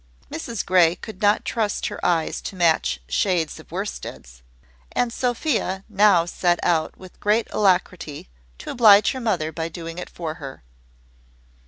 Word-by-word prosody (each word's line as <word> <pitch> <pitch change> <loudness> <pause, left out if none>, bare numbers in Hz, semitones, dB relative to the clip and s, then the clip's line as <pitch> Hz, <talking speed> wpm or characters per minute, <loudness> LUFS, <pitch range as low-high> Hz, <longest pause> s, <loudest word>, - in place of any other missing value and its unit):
Mrs 225 +5 -4
Grey 175 -2 +4
could 215 -1 -10
not 205 0 +3
trust 215 -3 -1
her - - -5
eyes 165 -2 0
to - - -6
match 165 - +2
shades 170 - 0
of 160 - -15
worsteds; 65 - -6 0.5
and 240 -2 0
Sophia 240 - -1
now 200 -5 +4
set 175 0 0
out 165 -3 +1
with 185 -1 -14
great 215 +2 +2
alacrity 180 - 0 0.3
to - - -7
oblige 215 -3 +6
her 260 - -5
mother 180 -9 0
by 160 +1 -4
doing 165 +1 -7
it - - -7
for 165 -3 -5
her. 135 -1 -8
180 Hz, 150 wpm, -23 LUFS, 165-210 Hz, 0.5 s, oblige